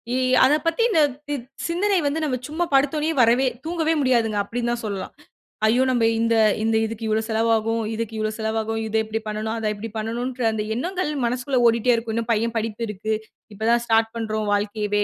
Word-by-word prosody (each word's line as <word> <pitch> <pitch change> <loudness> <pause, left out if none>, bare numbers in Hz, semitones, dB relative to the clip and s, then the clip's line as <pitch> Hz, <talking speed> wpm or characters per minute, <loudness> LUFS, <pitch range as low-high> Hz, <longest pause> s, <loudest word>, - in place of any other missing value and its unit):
இ - - +1 0.3
அத 260 +3 +5
பத்தி 330 +7 +1
இந்த 395 - +3 0.3
இத் 250 -4 -5 0.2
சிந்தனை 380 +4 +1
வந்து 285 +3 0
நம்ம 270 -5 0
சும்மா 320 +4 -1
படுத்தோனே 290 +3 +2
வரவே 240 +3 +4 0.2
தூங்கவே 325 -1 0
முடியாதுங்க, 235 -5 +2
அப்படின்னு 235 +3 -2
தான் 240 0 -2
சொல்லலாம். 200 -2 -4 0.5
ஐயோ! 240 +4 +3
நம்ம 240 -2 +1 0.2
இந்த 230 0 +2 0.3
இந்த 225 0 +1
இதுக்கு 225 0 -5
இவ்ளோ 220 0 +1
செலவாகும். 225 0 +1
இதுக்கு 225 0 -4
இவ்ளோ 215 0 -1
செலவாகும். 220 0 -1
இத 220 - -5
இப்படி 220 +1 -3
பண்ணனும், 215 +1 -3
அத 220 -1 -1
இப்படி 220 +2 -6
பண்ணனும்ன்ற 240 +3 -3
அந்த 220 -1 -2
எண்ணங்கள், 355 +5 -2
மனசுக்குள்ள 250 +2 0
ஓடிட்டே 230 +2 +3
இருக்கும். 230 -1 -3
"இன்னும் 230 0 -2
பையன் 230 +1 -1
படிப்பு 225 +1 -3
இருக்கு. 215 +1 -3 0.4
இப்ப 210 - -17
தான் 235 0 +3
ஸ்டார்ட் 225 -1 +2
பண்றோம், 215 -1 -2
வாழ்க்கையவே". 205 0 0
230 Hz, 185 wpm, -23 LUFS, 220-255 Hz, 0.5 s, அத